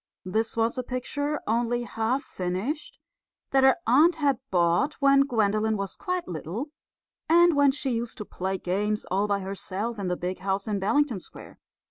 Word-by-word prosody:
This 220 +5 -1
was 230 +2 +1
a - - -2
picture, 285 +4 -3
only 240 +2 0
half 235 +4 -1
finished, 195 - -4 0.5
that 270 0 +4
her 265 0 +6
aunt 335 +4 +5
had 285 -6 +1
bought 175 - +2
when 275 -1 +4
Gwendolen 220 -2 +1
was 195 -1 -4
quite 365 -2 -3
little 180 - -5 0.6
and 345 0 +6
when 285 -1 +5
she 270 -1 -1
used 235 0 -3
to 210 - -6
play 190 +1 -3
games 205 +4 -1
all 200 +3 +1
by 200 -1 0
herself 200 +3 -4
in 195 - -2
the 180 0 -1
big 180 +1 -4
house 195 +1 -2
in 205 -2 -1
Bellington 240 +3 +1
Square. - - -13
225 Hz, 170 wpm, -26 LUFS, 195-275 Hz, 0.6 s, her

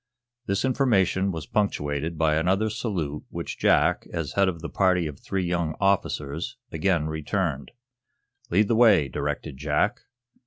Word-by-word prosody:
This 100 +5 0
information 100 -8 +2
was 80 -4 -5
punctuated 80 -5 -1
by 80 -1 +2
another 95 +7 +1
salute 90 -10 -3
which - - -6
Jack, - - +3
as 80 -5 -3
head 100 -1 +3
of 85 -3 -6
the 85 - -4
party 90 -2 +2
of 75 -3 -6
three 95 -2 -2
young 85 -3 -1
officers, 85 -6 -1
again 85 -1 +1
returned. 80 -2 -2 0.8
"Lead 100 +4 +3
the 115 - +2
way," 105 - +5
directed 65 - -4
Jack. 75 - 0
85 Hz, 145 wpm, -25 LUFS, 75-100 Hz, 0.8 s, way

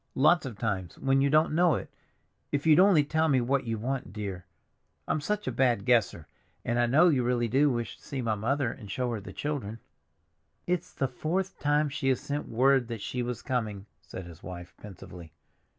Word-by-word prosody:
"Lots 150 +2 +4
of 115 -5 -8
times, 100 -6 -3
when 135 0 +2
you 140 - +3
don't 155 +1 +3
know 170 0 +4
it. - - -5 0.6
If 145 +1 -1
you'd 155 0 +6
only 185 -5 +6
tell 160 +2 +1
me 135 -4 +3
what 130 +2 0
you 115 -1 -2
want, 125 0 -3
dear. 100 -3 -6 0.6
I'm 155 - 0
such 210 +6 -2
a - - -1
bad 120 -6 +1
guesser. 115 -10 +2 0.4
And 120 +1 0
I 120 - +3
know 155 +9 +5
you 135 -6 +2
really 120 -1 +1
do 135 +6 +3
wish 120 -3 -3
to - - -25
see 140 - -5
my 115 -3 0
mother 120 +4 0
and 105 - -11
show 125 +5 -2
her 115 - -3
the - - -9
children." 135 -8 -4 0.9
"It's 175 -1 -2
the 135 - -1
fourth 170 +9 -3
time 150 +1 +2
she 135 -1 -1
has 130 - +2
sent 145 +1 -4
word 130 +1 +3
that 115 -3 -6
she 125 +4 -3
was 120 -1 -4
coming," 110 -6 -2 0.2
said 85 +3 -9
his 85 -1 -12
wife 90 -1 -9
pensively. 90 -5 -11
125 Hz, 205 wpm, -28 LUFS, 110-145 Hz, 0.9 s, you'd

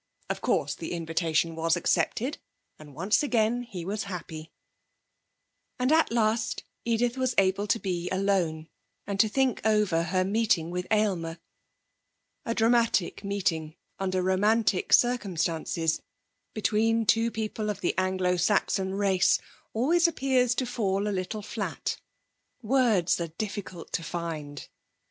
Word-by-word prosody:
Of - - -4
course 145 0 +1
the 160 +4 -6
invitation 165 -1 0
was 165 +1 +1
accepted, 250 - 0 0.4
and 150 -3 -13
once 190 +8 +2
again 240 -4 +1
he 190 -8 -7
was 205 +2 -3
happy! 165 -4 -7 1.3
And 255 +2 +1
at 320 -4 +4
last 220 -1 0 0.2
Edith 235 +2 0
was 255 -2 0
able 195 +1 +2
to 210 - +2
be 180 -4 -3
alone, 185 -5 0 0.4
and 200 -1 -4
to 220 - +5
think 265 +1 +1
over 210 -6 +2
her 185 +2 +1
meeting 195 -5 +1
with 180 0 -3
Aylmer. 185 -7 0 1.1
A 230 - -1
dramatic 230 -5 +2
meeting 170 -6 -1 0.2
under 185 -1 0
romantic 200 +2 +2
circumstances 170 -8 +1 0.5
between 225 +1 +1
two 225 +2 +3
people 220 -1 -3
of 200 -2 -4
the 175 - +1
Anglo 185 -1 +1
Saxon 190 +1 +1
race 195 -2 +3 0.3
always 335 +10 +3
appears 260 -6 +1
to 255 - 0
fall 205 -5 -1
a 205 - -1
little 195 +3 -3
flat; - - -4 0.6
words 220 -8 +2
are 170 - -2
difficult 190 0 -6
to - - 0
find. 160 -4 -5
195 Hz, 130 wpm, -27 LUFS, 175-225 Hz, 1.3 s, to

